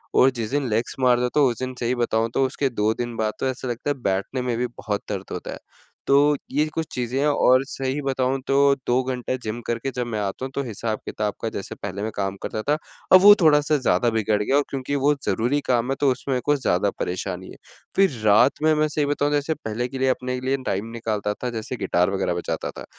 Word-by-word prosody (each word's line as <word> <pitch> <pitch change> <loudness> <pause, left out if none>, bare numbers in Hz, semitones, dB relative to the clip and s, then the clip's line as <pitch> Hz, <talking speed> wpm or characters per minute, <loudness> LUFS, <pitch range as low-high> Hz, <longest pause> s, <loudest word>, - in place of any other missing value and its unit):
और 130 - +6
जिस 115 -3 -4
दिन 145 -2 0
लेग्स 115 +2 -1
मार 125 -1 +4
लेता 125 +4 0
हूँ 140 -3 +5
उस 120 - -4
दिन 130 0 -3
सही 120 +1 0
बताऊँ 115 -2 0
तो 135 - +2
उसके 135 +1 -1
2 110 -2 +1
दिन 120 0 -4
बाद 110 -1 0
तो - - 0
ऐसा 130 0 -4
लगता 120 +4 -3
है 145 - +1
बैठने 100 +7 -1
में 125 -2 -1
भी 125 +1 0
बहुत 105 -4 -4
दर्द - - -3
होता - - -5
है, - - -8 0.5
तो 145 +1 +4
ये 150 +3 +2
कुछ 160 - -2
चीज़ें 125 +1 -2
हैं 145 - +2
और 130 -3 +4
सही 135 +1 -3
बताऊँ 135 -1 0
तो 135 - +2 0.3
2 125 +2 +2
घंटा 130 -1 -2
जिम 110 +2 -4
करके 120 +3 -2
जब 125 -1 -1
मैं 110 -3 -3
आता 100 +5 -3
हूँ, 135 - -7
तो 140 - -1
हिसाब-किताब 110 -2 -3
का 115 - -1
जैसे 100 - -6
पहले 100 0 -6
मैं 110 - -2
काम 95 -1 -2
करता 110 - -3
था, 145 +6 +1 0.4
अब 185 - +10
वो 205 +1 +10
थोड़ा-सा 150 -1 +4
ज़्यादा 125 -2 +2
बिगड़ 110 -1 +1
गया 135 - +1
और 145 - +3
क्योंकि 135 +1 -3
वो 140 +1 +3
ज़रूरी 125 +6 +1
काम 120 0 +1
है, - - +1
तो 140 - +4
उसमें 130 +1 -2
कुछ 145 -1 +2
ज़्यादा 100 -2 +2
परेशानी 95 0 -3
है, - - -10 0.4
फिर 195 -4 +4
रात 105 +6 +6
में 155 0 +5
मैं 155 0 +2
सही 150 -1 0
बताऊँ 145 0 0
जैसे 145 +2 +1
पहले 120 -4 -4
के 135 - -7
लिए 130 - +2
अपने 125 0 -1
लिए 135 +1 0
टाइम 100 0 -1
निकालता 110 -3 -2
था, 125 +4 -4
जैसे 115 +1 -4
गिटार 90 -3 +1
वग़ैरह 95 -2 0
बजाता 85 0 -3
था, - - -10
125 Hz, 240 wpm, -23 LUFS, 110-140 Hz, 0.5 s, अब